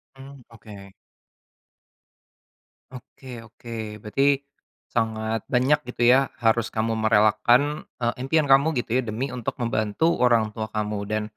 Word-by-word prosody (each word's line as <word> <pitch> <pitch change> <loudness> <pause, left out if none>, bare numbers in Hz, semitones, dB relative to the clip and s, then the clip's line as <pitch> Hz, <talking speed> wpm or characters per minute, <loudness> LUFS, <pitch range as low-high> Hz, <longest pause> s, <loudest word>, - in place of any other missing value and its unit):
Mmm, 135 0 -13
oke. 100 -3 -13 2.0
Oke 125 -2 -11
oke, 110 -2 -8
berarti 135 +6 +1 0.5
sangat 110 -1 -2
banyak 130 +4 +3
gitu 120 -1 +1
ya, 130 +2 +4
harus 115 -1 +1
kamu 115 0 -1
merelakan, 115 +7 +2 0.2
eee, 120 -1 0
impian 150 +1 +1
kamu 135 +4 +4
gitu 120 0 -3
ya 130 - +3
demi 115 +5 -3
untuk 125 -1 -5
membantu 115 +7 0
orang 115 -3 +2
tua 110 -1 -5
kamu 105 -1 -3
dan, 110 +1 -2
115 Hz, 125 wpm, -24 LUFS, 110-130 Hz, 2.0 s, ya